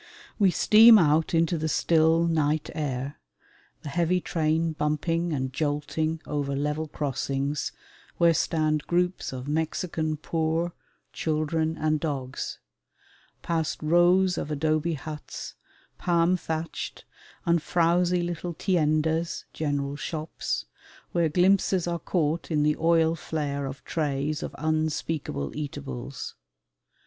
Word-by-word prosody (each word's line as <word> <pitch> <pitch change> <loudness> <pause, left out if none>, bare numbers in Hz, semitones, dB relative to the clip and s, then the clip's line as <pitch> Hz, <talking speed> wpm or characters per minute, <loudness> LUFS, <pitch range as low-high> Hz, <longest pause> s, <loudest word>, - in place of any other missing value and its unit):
We 200 -2 +5
steam 220 +5 +8
out 160 -2 +3
into 165 0 +2
the 160 +1 -1
still 165 +1 +3
night 155 -2 +1
air, 140 -1 -3 0.6
the 145 - -5
heavy 175 +4 +1
train 160 -1 0
bumping 165 +3 0
and 130 -3 -2
jolting 155 +2 -1
over 140 -2 -2
level 150 +2 -1
crossings 140 -1 -2 0.5
where 170 -1 +5
stand 155 -2 0
groups 180 +1 0
of 130 0 -6
Mexican 160 0 -1
poor, 165 +2 -1 0.4
children, 160 +1 -1
and 155 0 +1
dogs; 135 -4 -4 0.9
past 165 -2 -1
rows 175 +3 +4
of - - -4
adobe 155 +2 0
huts, 150 +1 -7 0.5
palm 170 0 +3
thatched, 160 -2 -4 0.4
and 170 -1 +3
frowsy 175 +2 +2
little 175 0 -4
tiendas 160 -2 +1
(general 145 -2 -2
shops), 155 +1 -3 0.5
where 170 -2 +2
glimpses 185 +2 +3
are 170 -1 -2
caught 165 -1 -1
in 150 -3 +2
the 150 0 +3
oil 165 0 +3
flare 145 -3 -3
of 135 +1 -8
trays 150 -1 -1
of - - -5
unspeakable 155 - -2
eatables. 140 -3 -6
155 Hz, 115 wpm, -27 LUFS, 150-170 Hz, 0.9 s, steam